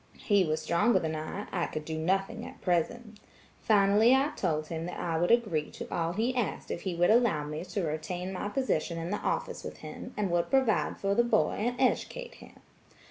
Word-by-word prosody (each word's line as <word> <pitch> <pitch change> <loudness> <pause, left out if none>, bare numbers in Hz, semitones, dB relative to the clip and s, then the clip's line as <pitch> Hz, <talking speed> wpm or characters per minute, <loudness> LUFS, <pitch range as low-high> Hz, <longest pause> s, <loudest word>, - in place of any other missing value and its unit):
He 205 -3 +3
was 155 -1 -1
stronger 205 +9 +3
than 160 -1 -1
I; 155 +7 -5
I 175 -2 0
could 155 0 -5
do 160 - -4
nothing 190 +5 -1
at - - -10
present. 210 +5 -1 0.4
Finally 210 +3 +5
I 275 +3 +2
told 155 -4 -1
him 165 0 -4
that 180 - -6
I 165 -2 -1
would 175 - +1
agree 210 -11 +2
to - - -8
all 165 0 0
he 230 +6 0
asked 245 -4 -2
if - - -3
he 185 -3 -3
would 175 +4 +4
allow 225 -10 +3
me 150 +2 -5
to 185 +1 -3
retain 175 +4 -3
my 195 +2 -3
position 195 - -1
in 165 +2 -4
the 210 - 0
office - - -2
with - - -7
him, - - -8
and 200 -4 0
would 170 0 +1
provide 265 -5 +2
for 195 0 0
the 235 - +4
boy 235 - +2
and 240 +4 0
educate 485 - 0
him. - - -15
185 Hz, 210 wpm, -29 LUFS, 165-220 Hz, 0.4 s, Finally